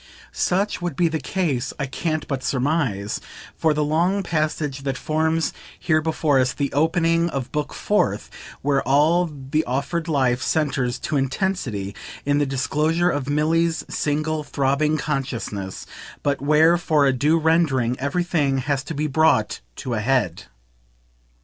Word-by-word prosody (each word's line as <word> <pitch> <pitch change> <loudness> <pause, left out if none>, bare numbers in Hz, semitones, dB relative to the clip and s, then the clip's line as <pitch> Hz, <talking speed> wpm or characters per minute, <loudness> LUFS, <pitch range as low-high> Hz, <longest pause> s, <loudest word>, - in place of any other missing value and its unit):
Such 195 +2 0
would 175 -5 -3
be 170 +3 +2
the 160 0 -2
case, 145 -4 -1
I 140 - -1
can't 155 +3 -3
but 135 -3 -2
surmise, 130 -7 -1 0.3
for 160 - +2
the 150 0 +1
long 175 +7 +1
passage 155 -4 -1
that 135 -1 -2
forms 160 +3 0 0.3
here 155 -2 +2
before 155 -3 +1
us 130 0 +2
the 140 0 -2
opening 165 +2 +2
of 130 -5 -4
Book 150 -2 -2
Fourth, - - 0 0.4
where 140 -1 +2
all 155 +7 +3
the 150 +1 -2
offered 140 +6 -2
life 130 -5 +1
centres, 135 -6 0
to 150 - -2
intensity, 135 - -1 0.3
in 145 0 +2
the 145 - +1
disclosure 155 +6 +1
of 145 -1 -3
Milly's 160 +3 +1
single 155 +1 -1
throbbing 140 +2 +1
consciousness, 125 -10 -3 0.4
but 145 -1 0
where, 155 +4 +4
for 155 -4 +2
a 135 - +3
due 150 +6 +2
rendering, 155 -7 +2
everything 145 -1 0
has 135 +1 -1
to 165 - -5
be 150 +2 -1
brought 155 -6 +2
to 125 - -4
a 110 - 0
head. 120 -8 0
150 Hz, 150 wpm, -22 LUFS, 135-160 Hz, 0.4 s, where